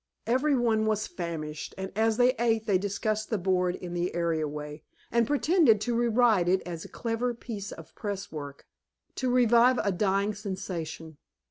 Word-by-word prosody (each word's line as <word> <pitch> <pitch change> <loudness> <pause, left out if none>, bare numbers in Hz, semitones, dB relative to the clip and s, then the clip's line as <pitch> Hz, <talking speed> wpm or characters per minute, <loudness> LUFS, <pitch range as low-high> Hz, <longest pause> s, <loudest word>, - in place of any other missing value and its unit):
Every 260 +6 +2
one 220 -3 +2
was 215 -1 +1
famished, 160 -3 -5
and 190 0 -5
as 220 0 +2
they 250 +1 +5
ate 225 -2 +1
they 195 -3 +2
discussed 210 +2 -2
the 220 - 0
board 180 -1 +1
in 175 -2 -7
the 175 0 -2
area 165 -3 0
way, 150 +1 -7 0.3
and 235 -1 +2
pretended 290 - +4
to 240 +1 -1
deride 230 -6 +3
it 185 +1 +3
as 170 -2 -6
a - - -10
clever 240 +1 -2
bit 210 -4 -6
of 165 -2 -12
press 200 -2 -5
work, 145 -2 -8 0.5
to 255 - -1
revive 245 0 +5
a 200 - +1
dying 200 +2 +1
sensation. 185 -6 -6
205 Hz, 170 wpm, -28 LUFS, 175-230 Hz, 0.5 s, they